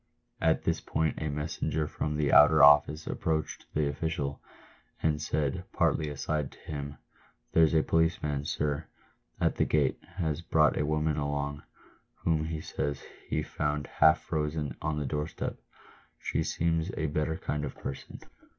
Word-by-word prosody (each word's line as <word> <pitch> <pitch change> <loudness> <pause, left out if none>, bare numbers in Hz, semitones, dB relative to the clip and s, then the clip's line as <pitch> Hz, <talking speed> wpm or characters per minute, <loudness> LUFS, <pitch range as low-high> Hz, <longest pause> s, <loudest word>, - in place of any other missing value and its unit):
At - - +2
this - - 0
point 80 -2 -1
a 80 - -1
messenger 75 +1 -2
from 75 0 -3
the 75 -2 +1
outer 75 -1 +8
office 75 +2 +6
approached 80 -1 -2
the 75 -1 +2
official, 70 -1 -2 0.6
and 75 -1 +1
said, 75 -2 -1
partly 75 -1 +1
aside 75 0 -2
to - - -18
him, 70 -1 -6 0.3
" - - -36
There's 80 -1 +5
a 80 - +4
policeman, 75 -3 +1
sir, 75 +1 -1 0.5
at - - +1
the - - +3
gate, 75 -3 +1 0.2
has 80 -3 -1
brought 80 -3 +3
a 75 - 0
woman 75 0 +1
along, 70 0 -2 0.5
whom 80 -2 0
he 80 -1 -4
says 70 -2 -3 0.2
he - - -1
found 75 -1 -2
half 80 +4 +4
frozen 75 -3 -2
on 75 -1 -1
a 75 - -2
door 75 +2 -1
step. - - -5 0.6
She - - -1
seems 80 +1 0
a 80 - 0
better 75 +1 -1
kind 75 0 -3
of 75 - -4
person." 70 - -7
75 Hz, 160 wpm, -29 LUFS, 75-80 Hz, 0.6 s, outer